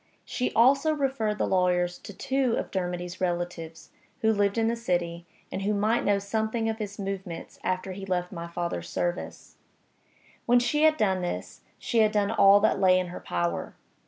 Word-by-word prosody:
She 250 - -2
also 275 +6 +4
referred 265 -7 -1
the - - +1
lawyers 180 -1 +1
to - - -10
two 260 +4 0
of - - -4
Dermody's 180 -1 -4
relatives, 175 -2 -3 0.3
who 220 0 +3
lived 205 0 +1
in 225 0 +2
the 230 - +1
city, 175 -6 -2 0.2
and 190 - -3
who 205 +2 0
might 215 +3 +1
know 205 -1 +3
something 220 +3 -1
of 220 0 -2
his 205 -1 -5
movements 195 -3 -6
after 185 +1 -2
he 195 +1 -7
left 180 -1 -1
my 170 -2 -6
father's 170 0 -4
service. 175 0 -4 0.9
When 245 +1 +5
she 245 +5 +1
had 310 0 +4
done 190 -4 +1
this, 175 - -5 0.2
she 235 - -1
had 215 -1 +4
done 205 -1 +1
all 200 -2 +6
that 215 - +2
lay 185 -1 +5
in 180 -1 -3
her 180 - -7
power. 85 -1 -3
195 Hz, 185 wpm, -27 LUFS, 180-225 Hz, 0.9 s, all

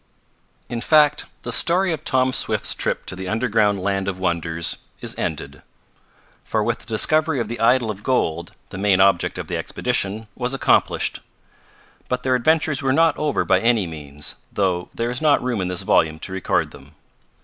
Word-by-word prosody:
In 120 -1 -4
fact 150 +1 +4 0.2
the - - -4
story 180 +2 +3
of 155 - -6
Tom 130 0 +1
Swift's - - +1
trip - - -1
to - - -3
the 95 0 -6
underground 110 -1 +1
land 95 0 -2
of 95 -2 -2
wonders 85 -2 -1 0.2
is - - -5
ended, - - -4 0.8
for - - -1
with - - -1
the - - -8
discovery 155 +6 +2
of 115 - -2
the 120 - -6
idol 115 -1 +3
of 100 -1 -9
gold 85 -10 -1 0.2
the 95 - -8
main 100 -2 +3
object 95 -2 +3
of - - -5
the - - -3
expedition 105 +3 -2
was 125 +3 -1
accomplished. - - +1 0.9
But 125 0 -2
their 130 - +1
adventures 155 +3 +2
were 135 -1 +1
not 165 +2 +3
over 150 -2 -1
by - - +3
any 115 -4 +2
means, 75 -3 -7
though 90 -3 -1
there 115 +1 -2
is 125 - -4
not 150 -4 +3
room 120 -5 -1
in 90 - -2
this 90 -1 -1
volume 80 -1 +2
to 95 - -1
record 95 - -1
them. 70 +3 -15
110 Hz, 180 wpm, -21 LUFS, 95-130 Hz, 0.9 s, fact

